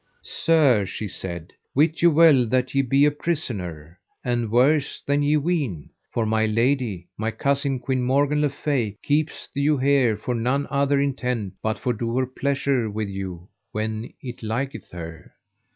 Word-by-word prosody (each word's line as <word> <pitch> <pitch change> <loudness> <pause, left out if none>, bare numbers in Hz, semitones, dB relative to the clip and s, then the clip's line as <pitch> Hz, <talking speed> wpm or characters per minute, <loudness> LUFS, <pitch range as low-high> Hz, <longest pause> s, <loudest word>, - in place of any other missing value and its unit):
Sir, 145 -10 +3
she 105 +3 -4
said, 85 -2 -7 0.2
wit 155 +4 +2
you 170 - +7
well 150 -6 +6
that 130 +2 0
ye 135 - +3
be 135 +2 +3
a 150 - +4
prisoner, 95 - -4 0.2
and 120 -2 -1
worse 135 +6 +2
than 145 +1 +2
ye 145 +1 +3
ween; 145 - -2 0.2
for 115 - 0
my 110 0 +2
lady, 115 -4 0
my 110 +1 0
cousin 140 +2 0
Queen 130 0 -1
Morgan 140 +4 +2
le 150 - +2
Fay, 130 -7 -2
keepeth 150 +1 -1
you 140 +1 +2
here 130 -5 +3
for 125 +4 -3
none 125 +5 0
other 140 0 +2
intent 125 -7 -1
but 110 0 -1
for 125 - -1
to 110 - -11
do 115 +1 -1
her 130 - +2
pleasure 135 -2 0
with 105 0 -3
you 95 -2 -6 0.2
when 110 +1 -3
it 125 -2 -7
liketh 125 +6 -3
her. 85 -2 -9
125 Hz, 170 wpm, -24 LUFS, 110-140 Hz, 0.2 s, you